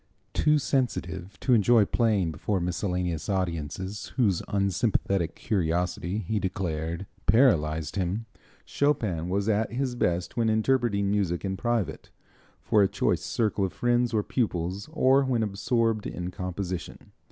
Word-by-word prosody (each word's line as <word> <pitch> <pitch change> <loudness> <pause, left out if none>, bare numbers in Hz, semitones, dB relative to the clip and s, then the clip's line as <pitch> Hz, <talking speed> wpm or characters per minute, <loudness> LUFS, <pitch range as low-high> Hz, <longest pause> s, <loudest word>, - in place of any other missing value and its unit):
Too 150 0 +3
sensitive 125 -9 -2
to 130 - +2
enjoy 110 0 +5
playing 105 -7 +1
before 95 +6 -1
miscellaneous 90 -2 -2
audiences 95 +1 -3
whose 105 -9 +2
unsympathetic 100 -3 0
curiosity, 90 0 -1
he 110 +1 -1
declared, 85 -2 -3 0.2
paralyzed 80 - +3
him, 95 +4 -1 0.4
Chopin 105 - 0
was 100 +2 0
at 110 +1 +1
his 130 0 -1
best 90 -6 -1
when 115 -2 +2
interpreting 110 -3 +1
music 95 -3 0
in 95 0 -1
private, 120 -1 -2 0.5
for 105 - +3
a 100 - +5
choice - - 0
circle 105 -3 0
of 95 - -1
friends 120 -1 +1
or 110 -2 +1
pupils, 95 - -2
or 135 -3 +4
when 125 -4 +1
absorbed 110 +1 0
in 90 +1 -5
composition. 90 0 -5
100 Hz, 130 wpm, -27 LUFS, 90-115 Hz, 0.5 s, enjoy